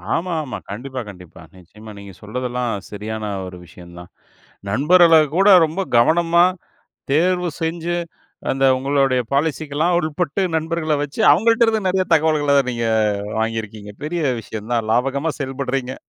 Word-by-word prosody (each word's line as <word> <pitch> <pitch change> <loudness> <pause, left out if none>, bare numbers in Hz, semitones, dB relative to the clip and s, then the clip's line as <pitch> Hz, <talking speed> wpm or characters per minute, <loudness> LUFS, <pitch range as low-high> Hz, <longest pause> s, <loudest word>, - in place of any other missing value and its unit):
ஆமா, 180 +2 -2
ஆமா. 135 - -6
கண்டிப்பா, 130 +6 -6
கண்டிப்பா. 90 -4 -13 0.2
நிச்சயமா. 105 +5 -14
நீங்க 100 -1 -11
சொல்றதெல்லாம் 125 +2 -3 0.2
சரியான 110 +1 -6 0.2
ஒரு 90 -1 -9
விஷயம்தான். 85 0 -13 0.6
நண்பர்களைக் 155 - +4
கூட 195 +3 +4 0.2
ரொம்ப 160 +5 -4 0.2
கவனமா 170 +7 +4 0.7
தேர்வு 180 +4 +2
செஞ்சு, 165 +1 -2 0.5
அந்த 135 0 0
உங்களோட 135 0 +1 0.2
பாலிசி 155 +2 0
க்கெல்லாம் 160 +5 +1
உட்பட்டு, 160 +2 -2
நண்பர்களை 160 -1 -1
வச்சு 145 +7 -6
அவங்கள்ட்ட 230 +1 +3
இருந்து 220 -3 0
நிறைய 185 0 +1
தகவல்களை 150 -2 +2
நீங்க 120 -1 -2 0.5
வாங்கியிருக்கீங்க. 110 -2 -4
பெரிய 170 +3 -3 0.2
விஷயம்தான். 110 +1 -4
லாபகரமா 135 +6 0
செயல்பட்றீங்க. 135 -1 -3
140 Hz, 125 wpm, -20 LUFS, 115-165 Hz, 0.7 s, நண்பர்களைக்